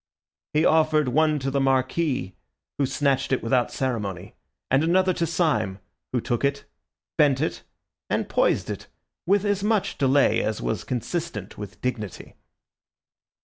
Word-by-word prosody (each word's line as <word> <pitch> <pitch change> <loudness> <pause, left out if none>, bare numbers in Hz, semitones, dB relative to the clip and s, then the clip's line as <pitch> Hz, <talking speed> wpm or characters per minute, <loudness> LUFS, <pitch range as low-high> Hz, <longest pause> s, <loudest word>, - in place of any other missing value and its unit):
He 155 +2 +4
offered 155 -3 +3
one 155 +3 +3
to 135 -1 -2
the 140 - +1
Marquis, 135 - 0 0.5
who 140 - +2
snatched 135 0 0
it 130 - +1
without 120 +1 +1
ceremony, 105 -9 -3 0.4
and 135 +3 +4
another 185 +3 +3
to 170 -1 -1
Syme, 160 - 0 0.3
who 125 - +1
took 120 +2 -2
it, 140 0 0 0.5
bent 140 -3 +4
it, 155 - -2 0.5
and - - 0
poised - - +1
it - - -7 0.4
with 200 +2 +3
as 205 -1 0
much 210 -6 0
delay 140 0 +4
as 110 - -2
was 110 -5 -2
consistent 125 - -4
with 105 -1 -9
dignity. 110 -6 -4
140 Hz, 145 wpm, -25 LUFS, 125-160 Hz, 0.5 s, He